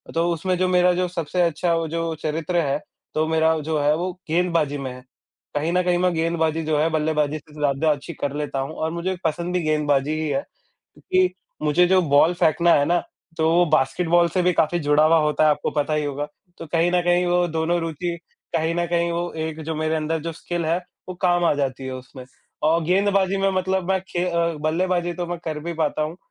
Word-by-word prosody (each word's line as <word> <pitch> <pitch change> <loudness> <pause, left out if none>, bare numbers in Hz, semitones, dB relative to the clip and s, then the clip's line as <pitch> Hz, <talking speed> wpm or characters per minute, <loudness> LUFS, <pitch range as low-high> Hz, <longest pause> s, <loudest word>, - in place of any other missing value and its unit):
तो 170 +1 +2
उसमें 180 +2 -1
जो 185 0 +1
मेरा 180 0 +4
जो 180 0 0
सबसे 175 0 -2
अच्छा 170 0 +1
जो 165 +1 -2
चरित्र 160 +3 -2
है 145 -4 +1 0.4
तो 155 - +1
मेरा 160 0 +2
जो 160 - 0
है 145 +1 +3
वो 180 +2 -2 0.2
गेंदबाजी 165 -3 +1
में 135 -2 -5
है। 125 0 -10 0.5
कहीं 155 +3 0
न 180 - +3
कहीं 180 0 +2
मैं 180 0 +2
गेंदबाजी 160 -1 0
जो 155 -1 0
है 160 - +2
बल्लेबाजी 155 -1 0
से 150 0 -20
ज़्यादा 150 +1 +1
अच्छी 150 +3 -4
कर 145 -2 -3
लेता 145 -2 -3
हूँ 135 +4 -3
और 160 0 -2
मुझे 175 +3 -2
पसंद 170 +3 -1
भी 180 - +1
गेंदबाजी 150 -2 +1
ही 155 - -1
है। 135 -1 0
क्योंकि 185 0 -3 0.3
मुझे 155 +4 +4
जो 185 0 +4
बॉल 155 +2 +4
फेंकना 170 0 +3
है 145 - +3
ना, 175 +2 +2 0.4
तो 160 0 +2
वो 175 +1 +5
बास्केटबॉल 170 +4 +3
से 180 +3 0
भी 180 - +3
काफ़ी 170 +2 +1
जुड़ा 150 0 +3
हुआ 165 +1 +5
होता 150 0 +1
है, 155 - +5
आपको 150 - 0
पता 150 0 -1
ही 150 - 0
होगा। 145 +1 -3 0.3
तो - - -7
कहीं 165 +2 +1
न 180 0 +3
कहीं 175 0 +2
वो 175 0 +2
दोनों 165 +1 0
रुचि 170 +2 -3 0.4
कहीं 165 +1 0
न 175 0 0
कहीं 170 0 0
वो 175 +1 -2 0.2
एक 160 0 -7
जो 160 - -3
मेरे 155 +1 0
अंदर 160 +1 -1
जो 165 +1 -4
स्किल 170 +1 -4
है 165 +2 +1 0.3
वो 180 - -5
काम 175 -1 +3
आ - - +4
जाती 135 -2 -2
है 130 - -4
उसमें। 130 0 -11 0.4
और 160 +2 +3
गेंदबाजी 195 +2 +2
में 195 0 +2
मतलब 185 0 -1
मैं 190 - +2
खे 175 0 -1
अ, 170 -1 0
बल्लेबाजी 175 +2 0
तो 175 0 -4
मैं 175 0 -3
कर 155 -1 -3
भी 170 +2 -5
पाता 155 -1 -1
हूँ 155 +3 -5
165 Hz, 225 wpm, -23 LUFS, 155-175 Hz, 0.5 s, वो